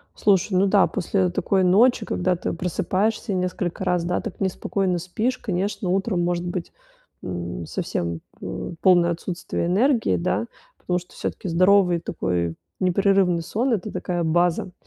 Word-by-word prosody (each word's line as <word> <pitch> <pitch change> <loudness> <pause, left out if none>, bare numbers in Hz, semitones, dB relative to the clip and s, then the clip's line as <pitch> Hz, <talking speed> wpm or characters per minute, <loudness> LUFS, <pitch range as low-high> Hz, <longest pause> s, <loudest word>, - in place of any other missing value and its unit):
Слушай, 195 -1 +2
ну 195 - +4
да, 195 -1 +4
после 185 +1 0
такой 190 +2 +1
ночи, 215 +5 +4
когда 180 0 0
ты - - -3
просыпаешься 195 +5 -1
несколько 180 -1 -2
раз, 180 -2 +1
да, 180 +1 0
так 220 - -7
неспокойно 190 -1 -1
спишь, 215 +9 -2
конечно, 190 -1 -2
утром 190 -1 0
может 175 0 -1
быть, 175 -1 -4 0.5
м, 85 -1 -5
совсем, 85 0 -3 0.2
п - - -5
полное 175 -2 +5
отсутствие 170 0 -3
энергии, 230 +6 +2
да 185 +6 -1 0.3
потому 180 0 -1
что 175 - -17
всё-таки 185 - -4
здоровый 185 0 +4
такой 85 - -2 0.2
непрерывный 185 -1 +3
сон- 235 +9 0
это 210 0 -2
такая 175 -2 -2
база 175 +2 +1
180 Hz, 145 wpm, -23 LUFS, 175-195 Hz, 0.5 s, полное